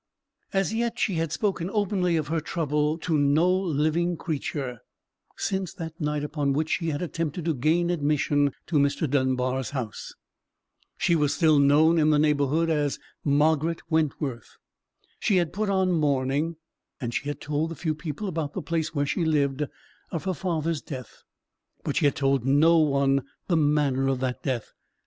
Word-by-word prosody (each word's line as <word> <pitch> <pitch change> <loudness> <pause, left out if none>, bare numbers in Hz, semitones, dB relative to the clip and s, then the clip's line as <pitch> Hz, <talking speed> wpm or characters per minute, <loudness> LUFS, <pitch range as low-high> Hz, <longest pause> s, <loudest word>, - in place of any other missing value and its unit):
As 195 +2 0
yet 235 +1 -1
she 200 - +1
had 165 -1 -1
spoken 185 -1 -1
openly 190 -5 +1
of 150 -2 -2
her 165 0 +1
trouble 150 -1 0
to 160 -2 0
no 145 +4 +3
living 170 -1 0
creature, 140 -6 -4 0.6
since 190 -2 -2
that 165 -2 -7
night 150 -1 -1
upon 145 -2 -1
which 155 +3 -1
she 165 -2 0
had 150 +2 -2
attempted 165 -1 -3
to 165 - +1
gain 160 +6 +1
admission 145 -2 +1
to 165 - 0
Mr. 140 +2 +1
Dunbar's 130 -2 0
house. 125 -7 -5 0.8
She 170 - +2
was 150 -3 +1
still 155 -4 +4
known 155 +4 +5
in 155 0 +4
the 150 - +4
neighbourhood 150 +2 +2
as 150 -3 0 0.3
Margaret 155 +3 +2
Wentworth. 145 -6 -1 0.6
She 200 - +2
had 170 -3 +1
put 210 +2 -1
on 190 -1 +2
mourning: 145 0 +1 0.4
and 120 -4 -4
she 145 - -2
had 145 - -4
told 150 +2 -1
the 165 - -6
few 155 0 -1
people 155 +5 -5
about 160 -5 -3
the - - -4
place 165 -1 -2
where 145 0 +1
she 170 +5 -1
lived, 145 -3 +1 0.5
of 165 - -4
her 190 0 -1
father's 165 -2 -2
death: 130 -6 -9 0.6
but - - -2
she - - +2
had 145 - +3
told 135 -2 +1
no 155 +6 +5
one 140 -2 +3 0.2
the 175 - +1
manner 145 -3 +2
of 135 -1 0
that 130 -1 -2
death. 125 -5 -3
155 Hz, 170 wpm, -26 LUFS, 140-165 Hz, 0.8 s, known